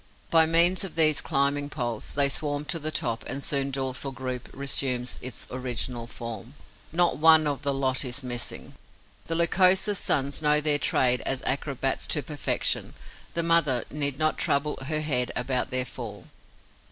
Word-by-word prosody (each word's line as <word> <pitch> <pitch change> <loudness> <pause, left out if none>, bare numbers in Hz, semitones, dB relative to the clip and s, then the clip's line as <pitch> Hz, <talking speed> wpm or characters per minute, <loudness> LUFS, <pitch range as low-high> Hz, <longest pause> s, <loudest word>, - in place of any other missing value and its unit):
By 160 -1 +6
means 170 +4 +4
of 190 -4 -7
these 155 -2 +4
climbing 145 -1 0
poles, 120 -6 -4
they 140 -1 +5
swarm 145 +1 -2
to 165 +2 -2
the 155 0 -2
top 115 -6 -2
and 140 - -4
soon 140 -4 0
the 135 - -6
dorsal 135 0 -2
group 130 -1 -6
resumes 130 -2 -1
its 130 -1 -6
original 125 -1 -3
form. 115 +2 -8 0.4
Not 170 -1 +2
one 160 0 +6
of 145 -2 -1
the 140 - 0
lot 135 -1 0
is 130 +2 -3
missing. 120 -1 -5 0.5
The 165 - -2
Lycosa's 185 +4 +3
sons 140 +1 0
know 150 0 +4
their 150 -1 +2
trade 125 -3 +2
as 135 -1 0
acrobats 135 -1 -1
to 150 - 0
perfection: 145 +2 -1 0.4
the 170 - 0
mother 165 -7 +2
need 145 -2 -1
not 155 0 0
trouble 145 +2 0
her 155 +2 -1
head 125 -5 0
about 125 0 -1
their 130 0 0
fall. 110 -6 -9
140 Hz, 165 wpm, -26 LUFS, 130-155 Hz, 0.5 s, By